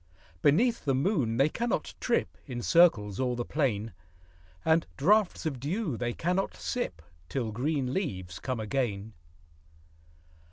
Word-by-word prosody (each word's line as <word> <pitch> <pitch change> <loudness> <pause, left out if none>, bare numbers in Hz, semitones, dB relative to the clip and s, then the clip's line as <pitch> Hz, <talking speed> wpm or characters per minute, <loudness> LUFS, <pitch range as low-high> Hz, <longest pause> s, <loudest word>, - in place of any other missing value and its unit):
Beneath 230 - +3
the 135 -3 +1
moon 135 - +1
they 135 +3 +5
cannot 235 +9 -2
trip 240 - 0
In 120 -3 -5
circles 115 - +4
o'er 125 -2 +1
the 120 0 -3
plain; 115 - -1 0.7
And 160 0 +3
draughts 200 +5 +3
of 140 -5 -2
dew 160 - -2
they 120 +1 -2
cannot 180 +9 -1
sip, 85 - -3 0.3
Till 120 -5 -2
green 130 +2 -1
leaves 95 - -3
come 130 -3 -3
again. 110 -2 -2
135 Hz, 130 wpm, -29 LUFS, 115-170 Hz, 0.7 s, they